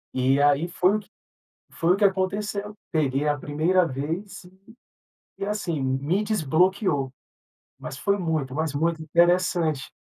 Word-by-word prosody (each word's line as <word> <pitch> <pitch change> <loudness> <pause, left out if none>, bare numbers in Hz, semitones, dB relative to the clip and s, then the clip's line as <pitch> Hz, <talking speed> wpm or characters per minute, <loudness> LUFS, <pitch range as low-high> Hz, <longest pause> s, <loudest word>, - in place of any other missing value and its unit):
E 130 +2 +2
aí 145 +3 +3
foi 185 +3 +2
o - - -3
que 215 - -17 0.6
foi 165 +2 +2
o - - 0
que 205 - +1
aconteceu. 200 +2 0 0.2
Peguei 145 -3 +1
a 145 -1 +2
primeira 160 +7 +1
vez 165 +10 -5
e 190 +2 -20 0.7
e - - -3
assim, 200 -8 -2
me 140 +10 0
desbloqueou, 175 - +1 0.7
mas - - -7
foi 200 0 0
muito, 160 -7 -2
mas 155 -1 -2
muito 160 +2 0
interessante. 170 -3 +2
170 Hz, 145 wpm, -25 LUFS, 145-190 Hz, 0.7 s, aí